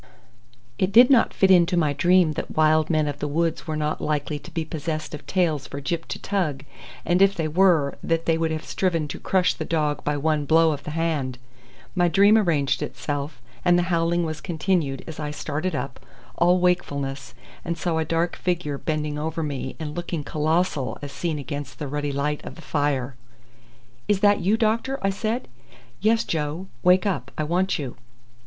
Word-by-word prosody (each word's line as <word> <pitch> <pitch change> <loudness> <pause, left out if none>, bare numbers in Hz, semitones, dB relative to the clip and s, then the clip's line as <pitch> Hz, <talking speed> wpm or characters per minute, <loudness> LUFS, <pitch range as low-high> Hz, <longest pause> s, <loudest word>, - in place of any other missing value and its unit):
It 185 +1 +1
did 245 +5 +7
not 250 -4 +5
fit 190 -1 +3
into 175 0 +5
my 155 -4 +2
dream 175 +2 +4
that 150 - -6
wild 155 0 +4
men 155 -2 +2
of 145 0 -4
the 150 - -2
woods 165 +3 -1
were 155 - -2
not 155 0 -2
likely 150 0 -1
to - - -12
be 165 -1 -3
possessed 155 0 -4
of 150 - -8
tails 165 -7 0
for 140 - -6
Gyp 165 +4 -3
to - - -4
tug, 155 -9 -2 0.4
and 175 +2 +2
if 195 0 +5
they 160 -2 -1
were, 160 -4 +3
that 165 0 -1
they 165 - +3
would 165 0 0
have 160 0 -4
striven 170 -5 0
to - - -6
crush 185 -1 +2
the - - -5
dog 150 -3 -1
by 150 0 0
one 150 0 0
blow 160 +1 +4
of 145 -2 -5
the - - -4
hand; 150 -6 -1 0.6
my 175 -2 +3
dream 200 +5 +5
arranged 150 - +2
itself, 145 -3 -4 0.2
and 175 -1 +4
the 175 - +2
howling 170 +1 +1
was 155 -1 -5
continued 160 -5 -1
as 160 -1 -8
I 150 -1 -3
started 150 +3 -3
up, 130 0 -4 0.4
all 175 +1 +4
wakefulness, 145 -7 -1 0.3
and 170 -1 -3
saw 165 -1 -1
a - - +1
dark 165 +2 0
figure 175 -6 -2
bending 150 -1 -2
over 160 +1 -2
me 140 -3 -4
and 150 -2 -5
looking 175 -3 -3
colossal 155 -1 0
as 140 - -5
seen 155 +3 -2
against 145 0 -6
the 150 - -4
ruddy 145 +1 -2
light 145 +2 -2
of - - -8
the - - -12
fire. 140 -4 -1 0.9
"Is 200 -2 +2
that 205 0 +5
you, 200 +5 +2
doctor?" 230 +4 0
I 195 - +2
said. 220 +5 -2 0.5
"Yes, 225 +2 +3
Joe; 155 +3 -3 0.2
wake 180 +2 +4
up. 140 - -1
I 155 - 0
want 180 +5 +1
you." 135 -6 -6
160 Hz, 195 wpm, -24 LUFS, 145-180 Hz, 0.9 s, did